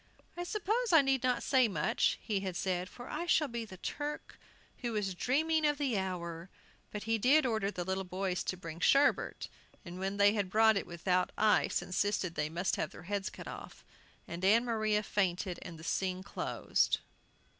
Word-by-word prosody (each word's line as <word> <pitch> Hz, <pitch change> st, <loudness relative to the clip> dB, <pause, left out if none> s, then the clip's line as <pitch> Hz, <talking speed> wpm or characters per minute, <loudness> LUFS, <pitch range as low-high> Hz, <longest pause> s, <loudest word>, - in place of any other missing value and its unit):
"I 350 Hz, 0 st, -4 dB
suppose 435 Hz, +4 st, -1 dB
I 325 Hz, -4 st, +7 dB
need 270 Hz, -1 st, +2 dB
not 250 Hz, -1 st, +1 dB
say 260 Hz, -3 st, +4 dB
much," 225 Hz, +3 st, +1 dB
he 210 Hz, -4 st, -1 dB
had 190 Hz, -2 st, -4 dB
said, 185 Hz, 0 st, -1 dB
"for 245 Hz, -, -10 dB
I 340 Hz, +3 st, -4 dB
shall 310 Hz, -3 st, +3 dB
be 235 Hz, -2 st, -4 dB
the 190 Hz, -3 st, -11 dB
'Turk 295 Hz, +9 st, -5 dB, 0.4 s
who 240 Hz, -2 st, -3 dB
was 205 Hz, -3 st, -1 dB
dreaming 310 Hz, -, +1 dB
of 295 Hz, -1 st, +2 dB
the 275 Hz, -5 st, 0 dB
hour.'" 175 Hz, -2 st, -4 dB, 0.4 s
But 210 Hz, -, -6 dB
he 225 Hz, 0 st, 0 dB
did 270 Hz, +6 st, +5 dB
order 220 Hz, -5 st, 0 dB
the 180 Hz, -3 st, -4 dB
little 190 Hz, +1 st, -2 dB
boys 185 Hz, 0 st, -2 dB
to 185 Hz, -, -2 dB
bring 165 Hz, -2 st, -8 dB
sherbet, 275 Hz, +10 st, +3 dB, 0.4 s
and 175 Hz, +1 st, -8 dB
when 195 Hz, +1 st, -2 dB
they 205 Hz, 0 st, +6 dB
brought 220 Hz, +3 st, +4 dB
it -, -, -3 dB
without 180 Hz, +1 st, 0 dB
ice 215 Hz, 0 st, +3 dB
insisted 185 Hz, -1 st, -1 dB
they 150 Hz, -2 st, -1 dB
must 175 Hz, +4 st, -1 dB
have -, -, -1 dB
their -, -, -12 dB
heads 200 Hz, +1 st, -2 dB
cut -, -, -10 dB
off, -, -, -9 dB, 0.4 s
and 170 Hz, +2 st, -6 dB
Ann 225 Hz, +5 st, +5 dB
Maria 215 Hz, -2 st, +1 dB
fainted, 185 Hz, -2 st, -1 dB
and 165 Hz, -, -8 dB
the 160 Hz, -, -12 dB
scene 185 Hz, +2 st, -1 dB
closed. -, -, 0 dB
205 Hz, 190 wpm, -32 LUFS, 185-250 Hz, 0.4 s, I